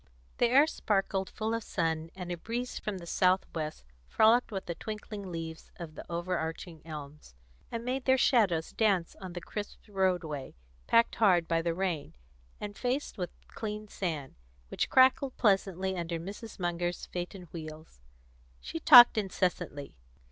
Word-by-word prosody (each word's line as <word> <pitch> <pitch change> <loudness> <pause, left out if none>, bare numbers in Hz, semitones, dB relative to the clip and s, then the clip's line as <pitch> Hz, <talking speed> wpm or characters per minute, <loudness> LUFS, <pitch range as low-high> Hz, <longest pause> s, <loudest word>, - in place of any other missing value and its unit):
The 240 - +5
air 270 +5 +6
sparkled 195 -8 -1
full 220 +1 -3
of 230 - -1
sun, 165 -4 -1
and 180 -2 -6
a - - -1
breeze 240 +7 -4
from 210 -2 -4
the 175 - -9
south 185 +2 +2
west 155 - -4 0.2
frolicked 225 - +4
with 195 -2 -4
the 170 - -3
twinkling 210 0 -7
leaves 165 -1 -6
of 170 -3 -8
the - - -8
overarching 170 -1 -3
elms, 150 - -9 0.4
and 230 0 -4
made 255 +1 -2
their 260 0 +5
shadows 200 -12 +3
dance 195 -6 +1
on 185 -2 -7
the 175 - -6
crisp 205 +3 -6
roadway, 180 -8 -1 0.3
packed 230 0 +4
hard 180 -6 +4
by 165 0 +1
the 165 0 -1
rain, 180 -6 -2 0.4
and 205 -1 -7
faced 250 -2 -2
with 180 -2 -2 0.2
clean 215 -1 -5
sand, 155 -10 -4 0.4
which - - -1
crackled 260 0 +4
pleasantly 190 -3 +1
under 170 -1 -3
Mrs. 205 +6 -8
Munger's 175 -1 -2
phaeton 180 +1 -6
wheels. 155 - -9 0.6
She 325 - -6
talked 245 -8 +9
incessantly. 180 - -2
185 Hz, 155 wpm, -30 LUFS, 165-215 Hz, 0.6 s, talked